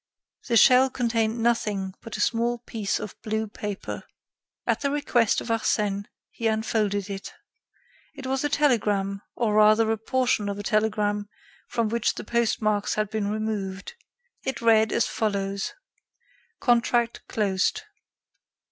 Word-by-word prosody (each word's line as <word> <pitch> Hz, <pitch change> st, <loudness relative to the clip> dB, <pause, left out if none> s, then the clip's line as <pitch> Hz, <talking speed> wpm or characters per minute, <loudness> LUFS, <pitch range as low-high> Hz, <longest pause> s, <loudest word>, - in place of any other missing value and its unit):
The 235 Hz, -2 st, +3 dB
shell 255 Hz, +3 st, +7 dB
contained 230 Hz, -3 st, 0 dB
nothing 210 Hz, -5 st, 0 dB
but 225 Hz, -2 st, -7 dB
a -, -, -2 dB
small 235 Hz, +2 st, +1 dB
piece 220 Hz, -3 st, -3 dB
of 210 Hz, -, -7 dB
blue 220 Hz, 0 st, -1 dB
paper. 205 Hz, -1 st, -5 dB, 0.6 s
At -, -, +1 dB
the 280 Hz, -, +1 dB
request 255 Hz, -6 st, +2 dB
of -, -, -8 dB
Arsène 210 Hz, -3 st, 0 dB, 0.3 s
he 230 Hz, -, -2 dB
unfolded 215 Hz, -2 st, 0 dB
it. 195 Hz, -1 st, -6 dB, 0.8 s
It 275 Hz, -2 st, -8 dB
was 265 Hz, +1 st, -1 dB
a 295 Hz, -, +1 dB
telegram, 205 Hz, -9 st, +1 dB
or 225 Hz, -3 st, 0 dB
rather 215 Hz, +1 st, +5 dB
a 225 Hz, -, -1 dB
portion 245 Hz, -3 st, 0 dB
of 200 Hz, -, -3 dB
a 205 Hz, -, -5 dB
telegram 210 Hz, -1 st, 0 dB, 0.4 s
from 230 Hz, -2 st, 0 dB
which 230 Hz, 0 st, 0 dB
the -, -, -6 dB
post 235 Hz, 0 st, 0 dB
marks 210 Hz, -1 st, +1 dB
had 215 Hz, -1 st, -1 dB
been 215 Hz, -2 st, -1 dB
removed. 210 Hz, -, -3 dB, 0.5 s
It 265 Hz, -3 st, -3 dB
read 220 Hz, -2 st, +4 dB
as -, -, +2 dB
follows: 200 Hz, -2 st, -2 dB, 0.9 s
"Contract 240 Hz, -1 st, +2 dB
closed. 195 Hz, -3 st, 0 dB
220 Hz, 140 wpm, -25 LUFS, 205-235 Hz, 0.9 s, shell